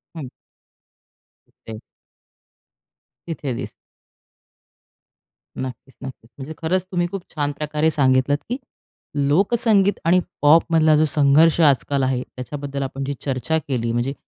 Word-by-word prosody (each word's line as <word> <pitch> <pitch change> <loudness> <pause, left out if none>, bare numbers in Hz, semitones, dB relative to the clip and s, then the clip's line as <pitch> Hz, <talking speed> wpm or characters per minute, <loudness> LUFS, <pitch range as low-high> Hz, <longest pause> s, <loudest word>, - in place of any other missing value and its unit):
हं. 150 -5 -6 1.2
तिथे 110 -1 -11 1.5
तिथे 150 -5 -4
दिसते 125 +2 -6 1.9
नक्कीच, 130 +1 -8
नक्कीच, 130 -3 -10
म्हणजे 140 +3 -7
खरंच 180 +3 -1
तुम्ही 175 -1 0
खूप 195 -2 -4
छान 145 -1 -1
प्रकारे 150 +1 0
सांगितलत, 130 0 +2
की 250 - -2 0.7
लोकसंगीत 200 +4 +2
आणि 175 +2 +4 0.2
पॉपमधला 160 +1 +4
जो 155 - +3
संघर्ष 155 +3 +4
आजकाल 140 -1 +2
आहे, 130 -1 0
त्याच्याबद्दल 140 +2 -6
आपण 135 +1 -5
जी 140 +1 -3
चर्चा 135 +3 -1
केली, 120 -4 -1
म्हणजे 120 +3 -1
145 Hz, 115 wpm, -21 LUFS, 130-160 Hz, 1.9 s, आणि